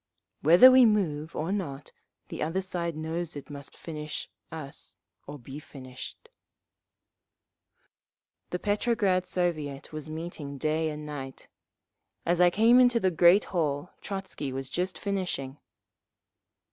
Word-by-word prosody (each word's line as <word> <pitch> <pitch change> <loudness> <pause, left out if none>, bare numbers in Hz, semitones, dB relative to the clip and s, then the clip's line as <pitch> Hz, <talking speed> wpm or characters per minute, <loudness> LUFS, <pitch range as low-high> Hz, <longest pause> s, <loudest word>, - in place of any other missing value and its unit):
"Whether 175 - +9
we 255 0 +8
move 165 -9 +1
or 165 +4 -2
not 150 -9 -4 0.4
the - - -6
other 170 +5 -1
side 170 -3 -2
knows 160 +1 -3
it 145 +1 -8
must 140 -1 -9
finish 150 -2 -6 0.2
us 155 -4 -7 0.3
or 145 +1 -7
be 135 +3 -9
finished…." 130 -4 -10 2.2
The 180 - -2
Petrograd 205 -2 +1
Soviet 155 -7 -2
was 155 0 -6
meeting 155 -3 -6
day 155 +2 0
and 150 0 -6
night. 135 -3 -7 0.8
As 175 +1 +2
I 180 - +7
came 225 +7 +5
into 245 -2 +5
the 190 -3 +2
great 175 +4 +6
hall 155 -1 -1
Trotzky 190 -8 -5
was 135 0 -4
just 185 +1 -2
finishing. 180 -9 -3
160 Hz, 125 wpm, -28 LUFS, 145-185 Hz, 2.2 s, Whether